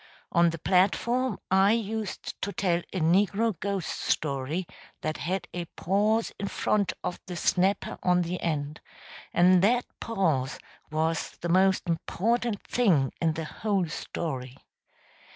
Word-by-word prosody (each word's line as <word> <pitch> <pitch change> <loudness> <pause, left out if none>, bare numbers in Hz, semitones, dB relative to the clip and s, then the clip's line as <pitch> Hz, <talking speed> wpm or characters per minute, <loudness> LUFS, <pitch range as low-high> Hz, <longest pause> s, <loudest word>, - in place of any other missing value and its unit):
On 170 -1 +5
the 165 - -4
platform 210 - +2
I 195 +2 +5
used 220 -2 -3
to 200 - -2
tell 175 -4 +1
a 190 - -2
negro 195 +5 +2
ghost 195 -4 -2
story 145 +4 -1 0.4
that 155 0 -2
had 180 +2 -2
a 175 -1 -3
pause 210 +5 +1
in 200 - -2
front 200 0 0
of 180 - -3
the 180 - -5
snapper 190 +3 +1
on 180 -1 +3
the 175 +1 -4
end, 150 -2 -2 0.5
and 180 +1 +5
that 240 +5 +3
pause 160 - 0 0.3
was 160 +1 -1
the 175 - -2
most 190 +1 +3
important 210 +6 -1
thing 175 - +2
in 165 -2 +2
the 160 0 -4
whole 195 +1 -1
story. 135 -5 -5
180 Hz, 135 wpm, -28 LUFS, 165-200 Hz, 0.5 s, On